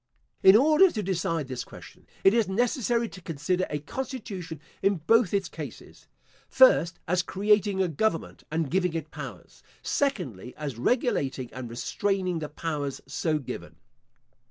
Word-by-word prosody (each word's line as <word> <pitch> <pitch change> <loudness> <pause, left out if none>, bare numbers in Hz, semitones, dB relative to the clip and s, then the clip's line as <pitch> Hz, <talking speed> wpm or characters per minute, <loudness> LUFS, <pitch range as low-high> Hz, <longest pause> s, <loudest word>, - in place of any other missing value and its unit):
In 190 +1 +8
order 310 - +6
to 215 -9 -3
decide 165 -5 -1
this 130 -2 -4
question, - - -14 0.2
it 195 - +6
is 230 -4 +3
necessary 235 +3 +1
to 185 - -11
consider 175 +3 -1
a 150 - -2
constitution 185 - -6 0.2
in 195 0 +3
both 200 +5 +3
its 200 -1 0
cases: - - -10 0.4
First, - - +5
as 180 +2 +2
creating 200 +1 +2
a - - +1
government 165 +3 -1
and 160 -2 -1
giving 180 -2 +1
it 160 -2 -4
powers. - - -9 0.2
Secondly, 130 - -2
as 140 -6 -5
regulating 135 - 0
and 125 -2 -6
restraining 185 - -1
the 150 -2 -5
powers 150 -3 -3
so 155 +3 -1
given. 135 - -7
180 Hz, 145 wpm, -27 LUFS, 150-210 Hz, 0.4 s, In